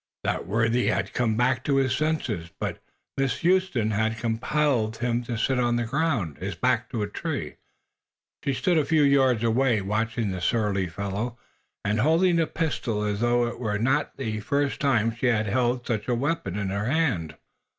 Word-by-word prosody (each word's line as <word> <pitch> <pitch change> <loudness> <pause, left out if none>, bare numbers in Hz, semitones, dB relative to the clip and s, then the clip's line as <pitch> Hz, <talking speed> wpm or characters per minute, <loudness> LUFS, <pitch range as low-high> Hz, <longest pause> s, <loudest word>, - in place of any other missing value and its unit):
That - - -2
worthy 115 +4 +1
had - - 0
come 115 -3 +1
back 130 +2 +2
to 140 - +2
his 135 -1 +2
senses, 135 - -1
but - - -3 0.4
Miss 135 -1 0
Huston 175 - +2
had 110 +1 0
compelled 115 0 0
him 120 0 0
to 115 -1 -3
sit 130 +4 +1
on 120 -1 +2
the 120 - 0
ground, 125 - -1
his 95 0 -4
back 125 +3 +1
to 115 -4 -2
a - - -2
tree. 105 - -4 0.9
She 140 - 0
stood 175 +3 +2
a - - +2
few 155 0 +3
yards 135 -5 +4
away, 115 0 +2
watching 110 +2 -1
the 95 -1 -4
surly 100 -2 +1
fellow 100 +6 -4 0.5
and 105 +1 +1
holding 165 +7 +3
the 165 -1 +2
pistol 120 -11 -2
as 105 -1 -1
though 120 +1 +2
it 120 - -5
were 105 -4 -1
not 135 +7 0
the 110 -5 -3
first 140 +6 -1
time 115 -5 +2
she 120 +2 0
had 110 -3 +2
had 120 +3 0
such 110 -3 -2
a 125 - +1
weapon 140 - -2
in 100 -2 -2
her 100 +2 -2
hand. 120 - 0
120 Hz, 185 wpm, -26 LUFS, 105-135 Hz, 0.9 s, yards